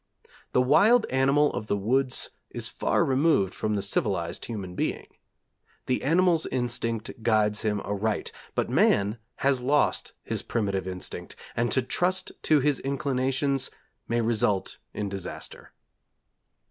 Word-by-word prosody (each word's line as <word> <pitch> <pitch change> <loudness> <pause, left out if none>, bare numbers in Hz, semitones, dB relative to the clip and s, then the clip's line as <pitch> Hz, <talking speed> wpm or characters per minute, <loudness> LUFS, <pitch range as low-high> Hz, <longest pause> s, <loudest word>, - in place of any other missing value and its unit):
The 125 - +4
wild 210 - +5
animal 135 +3 +3
of 105 - -4
the 100 - +1
woods 130 +6 +1 0.2
is - - -2
far - - +1
removed 130 - +2
from 105 -1 -1
the 100 - -1
civilized 95 -4 -1
human 100 -6 -5
being. - - -2 0.8
The 130 - 0
animal's 165 +2 +3
instinct 115 -2 -2
guides 105 -2 +2
him 105 -2 0
aright, 105 +1 -2 0.2
but - - +1
man 105 +3 +2 0.3
has 135 -2 +3
lost 145 +4 +1
his - - -3
primitive 100 -5 -2
instinct, 90 -1 -5 0.2
and 120 +1 +1
to 130 - +2
trust 185 +8 0
to 155 -2 +4
his 145 0 +2
inclinations 135 0 0 0.4
may 120 0 +1
result 105 -4 0
in 105 - -3
disaster. 95 -2 -6
120 Hz, 135 wpm, -27 LUFS, 105-140 Hz, 0.8 s, wild